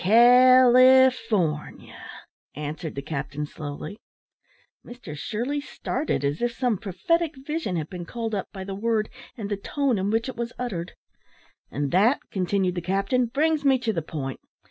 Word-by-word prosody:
"California," 255 +4 +7 1.4
answered 150 +2 -5
the 140 - -5
captain, 145 0 -4
slowly. 150 +7 -7 0.8
Mr 240 -11 -9
Shirley 240 - -3
started, 280 - -3
as 145 +2 -1
if 240 0 0
some 245 -7 0
prophetic 295 - 0
vision 300 - -2
had 160 -2 -2
been 175 0 -7
called 225 +2 -4
up 195 - -2
by 190 -2 -7
the 195 0 -6
word 215 +1 0 0.3
and 215 -3 -4
the 205 -1 -2
tone, 260 +2 -1
in 195 +2 -1
which 225 +3 0
it 260 - -5
was 235 0 -4
uttered. 190 -9 -4 0.8
"And 145 -1 -3
that," 220 +9 +4
continued 185 -1 0
the 175 - -3
captain, 195 +8 0
"brings 300 +5 +1
me 270 -2 +4
to 235 -3 -2
the 165 - -1
point. 140 -4 -5
215 Hz, 155 wpm, -25 LUFS, 175-255 Hz, 1.4 s, California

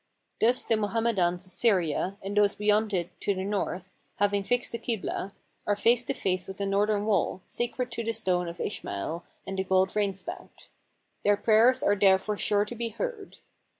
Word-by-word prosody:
Thus 240 +3 +3
the 225 - +1
Mohammedans 205 -5 0
of 185 - -9
Syria, 185 -4 +1
and 200 +1 -4
those 205 -1 +4
beyond 210 +1 +2
it 180 -2 -1
to 200 - 0
the 185 - -3
north, 190 -2 -3 0.2
having 205 0 +1
fixed 245 +4 0
the 235 - -4
Kiblah, 220 -4 -3 0.4
are 205 - +3
face 235 +4 +3
to - - -2
face 185 -1 -1
with 190 - -7
the 200 - -2
northern 205 +1 +1
wall, 195 -3 0
sacred 245 +1 -3
to 230 0 -3
the 230 - 0
Stone 185 -5 0
of 170 0 -7
Ishmael 160 - -4 0.2
and 195 0 -4
the - - +1
gold 190 0 +3
rainspout: 195 -3 -4 0.5
their 205 0 +4
prayers 230 +5 +4
are 205 - +3
there 195 -1 +5
fore 210 +2 -3
sure 205 0 +1
to 210 - -7
be 235 0 -3
heard. 435 - -5
205 Hz, 185 wpm, -28 LUFS, 190-225 Hz, 0.5 s, there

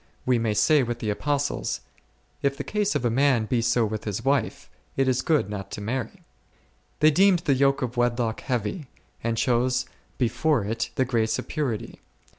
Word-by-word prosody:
we 125 -2 +3
may 110 -2 0
say 150 +6 +4
with 120 -2 -2
the 110 -3 -2
Apostles, 145 - -1 0.6
If 140 -1 0
the - - -4
case 210 -4 -1
of 135 -4 0
a 120 - +2
man 130 -2 +3
be 120 +1 0
so 120 0 +2
with 110 0 -4
his 105 +3 -4
wife, 140 0 0 0.3
it 135 -1 +2
is 130 -1 +2
good 155 -9 +2
not 100 -2 -6
to - - -5
marry. 115 +2 -4 0.8
They 155 +1 +7
deemed 185 +1 +4
the 140 - +4
yoke 135 +1 +2
of 120 0 -4
wedlock 120 -2 0
heavy, 125 - -3 0.4
and 115 0 -1
chose 125 +2 +1 0.3
before 130 0 +1
it 115 +2 -2
the 130 - +2
grace 115 -3 0
of - - -6
purity. 130 -8 -3
125 Hz, 185 wpm, -25 LUFS, 115-140 Hz, 0.8 s, They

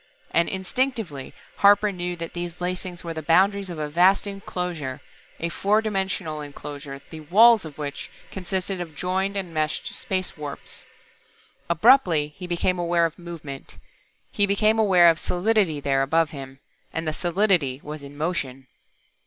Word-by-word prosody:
And 170 0 +2
instinctively 190 - -2 0.3
Harper 205 +1 +5
knew 180 -1 -4
that 165 -1 -6
these 175 0 -5
lacings 180 0 -4
were 165 -1 -4
the 160 - -5
boundaries 190 +5 +3
of 170 - -6
a 150 -1 -2
vast 180 +7 +4
enclosure 180 -8 -4 0.4
a 170 - -2
four 205 +5 +2
dimensional 190 -7 -2
enclosure, 145 -1 -8
the 160 - -7
"walls" 210 +6 +6
of 150 -3 -9
which 145 -2 -5 0.2
consisted 190 0 -3
of 160 -3 -7
joined 190 +4 -1
and 185 -4 -4
meshed 155 -1 -2
space 190 -7 -2
warps. 150 -2 -8 0.9
Abruptly 170 - +4
he 180 - -7
became 175 +1 0
aware 170 -1 +2
of 165 +1 -4
movement. 160 -6 -8 0.6
He 205 - +3
became 215 +2 +3
aware 185 -5 +6
of 165 -1 +4
solidity 185 -4 +1
there 135 -1 +1
above 160 +3 +2
him. 135 -2 -8 0.3
And 165 0 -3
the 155 - 0
solidity 175 -7 +1
was 150 0 -7
in 140 0 -11
motion. 135 -5 -3
175 Hz, 155 wpm, -24 LUFS, 155-195 Hz, 0.9 s, walls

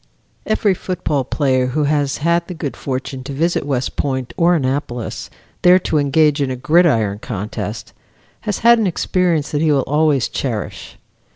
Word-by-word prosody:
Every 215 -2 +2
football 175 -6 -2
player 130 -2 +1
who 150 +4 -1
has 145 -1 0
had 170 +2 +1
the 180 - -6
good 150 -4 -4
fortune 130 0 -5
to 140 - -5
visit 165 0 0
West 130 -3 -2
Point 130 -3 -2
or 175 +1 +3
Annapolis, 130 -4 -3 0.3
there 180 +1 +7
to 160 -4 0
engage 145 +1 +2
in 140 - 0
a 130 - -2
gridiron 125 - +2
contest, 105 0 -5 0.5
has 210 -2 -3
had 235 0 +7
an 215 - +1
experience 175 -3 0
that 145 - 0
he 160 -1 +3
will 140 -2 +3
always 150 -2 +2
cherish. 115 -6 -5
145 Hz, 165 wpm, -18 LUFS, 130-170 Hz, 0.5 s, there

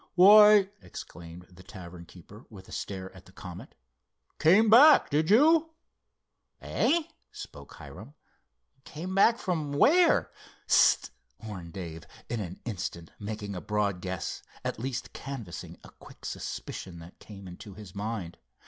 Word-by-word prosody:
"Why," 205 +1 +7
exclaimed 85 0 -11
the 90 0 -15
tavern 90 -2 -11
keeper, 100 +7 -15
with 95 -4 -13
a - - -15
stare 95 -1 -6
at - - -15
the - - -17
Comet, - - -11 0.6
"came 190 +8 +5
back, 275 +8 +7
did 155 +3 +1
you?" 320 +8 +4 0.8
"Eh?" 335 +3 0 0.3
spoke - - -11
Hiram—"came 155 +7 -12
back 225 +4 +4
from 160 -8 -3
where?" 335 - +4 0.4
"S - - 0
st!" - - +4 0.3
warned 90 -6 -8
Dave, 80 -4 -8 0.2
in 120 - -3
an 90 -3 -7
instant 90 -6 -6
making 105 -1 -6
a 90 - -6
broad 105 -3 -1
guess, 95 0 -5 0.2
at - - -3
least 130 +1 -5
canvassing 120 -11 -8
a - - -14
quick - - -16
suspicion 90 -2 -6
that 85 +2 -14
came 100 -3 -12
into 90 +2 -11
his 105 -3 -12
mind. 100 -4 -5
105 Hz, 140 wpm, -28 LUFS, -, 0.8 s, Why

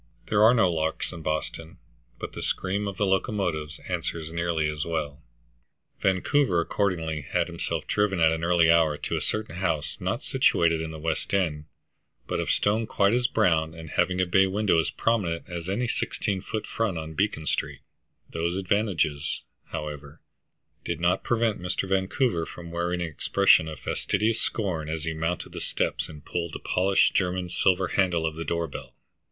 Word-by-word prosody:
There 105 -1 +3
are 115 +3 +7
no 110 -6 +5
larks 80 0 -1
in 85 - -8
Boston, 80 +1 -3 0.4
but - - -6
the - - -6
scream 100 +2 -1
of 100 -1 -5
the 105 - +2
locomotives 95 -6 -1
answers 80 -1 -3
nearly 85 -2 0
as 75 0 -2
well. 80 -2 -3 0.8
Vancouver 95 +2 +2
accordingly 85 -4 -1
had 70 - 0
himself - - -3
driven 105 -3 +1
at 80 -1 +5
an 80 0 -2
early 85 -1 +5
hour 80 -3 +4
to - - -3
a - - -1
certain 110 -6 -2
house 85 -5 -1
not - - -2
situated 85 -1 +3
in 80 - -4
the 80 - -7
West 80 +4 -1
End, 75 -6 0 0.6
but - - -2
of - - -2
stone 110 +2 +2
quite 100 0 +3
as 120 0 +3
brown, 80 -9 +2
and 80 -2 -9
having 90 +1 +1
a 95 - +3
bay 95 +2 +4
window 100 -3 +2
as 80 - +1
prominent 95 -8 0
as 85 0 -5
any 120 +6 0
sixteen 100 -3 -1
foot 110 +3 -4
front 110 -6 -1
on 80 0 -5
Beacon 95 -3 0
Street; - - -2 0.5
those 85 +2 -2
advantages, 95 -7 0 0.2
however, 75 -1 -6 0.6
did - - -3
not 85 +1 +2
prevent 115 -5 +1
Mr. 90 +2 -2
Vancouver 95 - +1
from 85 -1 -9
wearing 85 +1 -1
an 85 - -1
expression 80 +1 +4
of 80 -1 -6
fastidious 110 +1 0
scorn 85 -8 -2
as 80 -1 -3
he 80 0 -2
mounted 80 +2 -2
the - - -6
steps - - -1
and 75 -2 -11
pulled 85 -2 -3
the - - -5
polished 95 +2 +2
German 90 -1 0
silver 95 0 +2
handle 90 -4 +2
of 80 - -1
the 80 - -4
door 85 0 -1
bell. 70 - -9
85 Hz, 180 wpm, -26 LUFS, 80-100 Hz, 0.8 s, are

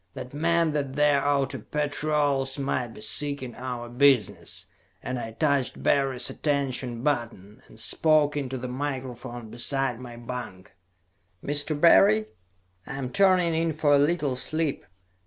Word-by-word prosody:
That 125 - -8
meant 165 +1 +1
that 140 -3 -2
their 145 -1 +3
outer 140 -1 0
patrols 145 -2 -1
might 135 -3 -1
be 110 -2 -12
seeking 135 +2 +1
our 125 0 -6
business, 125 -3 +1 0.4
and 130 0 -3
I 115 - -5
touched 140 -1 0
Barry's 135 -3 +2
attention 130 -5 -2
button, 120 -5 -3
and 110 - -14
spoke 150 +5 +2
into 135 -2 -3
the 125 0 -5
microphone 125 -3 -5
beside 125 0 0
my 120 -2 -9
bunk. 120 -6 -8 0.7
"Mr. 145 +1 -1
Barry? 110 - +6 0.6
I - - -6
am 130 -2 -4
turning 185 -4 +3
in 165 0 0
for 150 -1 +2
a 140 - +5
little 145 -3 +1
sleep. 155 +3 -2
135 Hz, 140 wpm, -26 LUFS, 125-150 Hz, 0.7 s, Barry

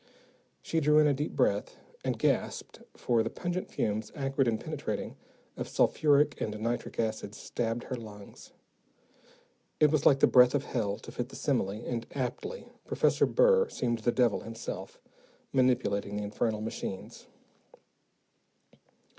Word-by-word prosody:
She 165 - 0
drew 150 0 +4
in 155 - +6
a 145 - +4
deep 145 +3 -3
breath - - +1 0.3
and - - -1
gasped, - - -1 0.2
for 120 -2 +2
the - - -1
pungent 175 +1 -4
fumes, 105 0 -2
acrid 135 -2 0
and 110 -1 +1
penetrating, - - -4 0.4
of - - -4
sulphuric 145 -1 +3
and 105 -1 -3
nitric 115 +2 -3
acids, 110 -2 -2
stabbed 115 0 -3
her 130 - -4
lungs. 105 -4 -11 1.3
It 150 -1 +5
was 155 -2 +2
like 135 - +5
the - - +7
breath 125 +1 +6
of 140 - +1
hell, 105 -7 -2
to - - -11
fit - - -4
the - - -11
simile, 95 - 0 0.2
and 120 -2 -3
aptly 130 - -4 0.2
Professor - - +2
Burr 480 -1 +4
seemed 120 -2 -1
the 120 +2 +1
devil 120 -4 +2
himself, 115 0 -7 0.5
manipulating 120 -6 +1
the 105 - -2
infernal 105 +1 -1
machines. 110 -3 -6
120 Hz, 145 wpm, -30 LUFS, 110-145 Hz, 1.3 s, the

